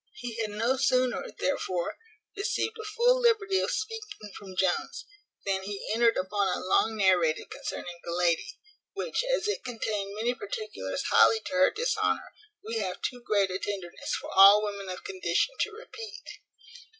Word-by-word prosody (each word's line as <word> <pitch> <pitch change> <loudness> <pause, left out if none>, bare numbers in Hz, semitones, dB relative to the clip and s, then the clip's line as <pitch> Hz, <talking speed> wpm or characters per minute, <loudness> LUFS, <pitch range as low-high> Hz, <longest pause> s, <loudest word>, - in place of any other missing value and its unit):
He 245 - -6
had 215 - -1
no 230 +5 0
sooner, 255 -1 +2
therefore, 185 -10 -1 0.4
received 405 +2 -1
a - - -5
full 475 +4 +3
liberty 425 -5 +3
of - - 0
speaking 430 - -5
from 190 -2 -10
Jones, 185 -1 0 0.4
than 195 -1 0
he 200 +1 -5
entered 230 0 +4
upon 200 +1 0
a 180 - 0
long 220 +4 +2
narrative 180 -5 +2
concerning 260 - -6
the 170 - -5
lady; 175 - 0 0.4
which, - - -2
as - - 0
it 420 - -2
contained 210 -4 -3
many 230 +3 0
particulars 435 - -5
highly 445 - +6
to - - -7
her 275 0 +5
dishonour, 480 +3 -1 0.3
we 225 +1 -3
have 185 -3 -3
too 245 -1 -3
great 200 -5 +1
a 185 - -2
tenderness 190 -5 -4
for - - -8
all 200 +2 +9
women 200 -2 -4
of 185 - -6
condition 405 +5 0
to 435 - +1
repeat. 445 0 -9
230 Hz, 160 wpm, -28 LUFS, -, 0.4 s, all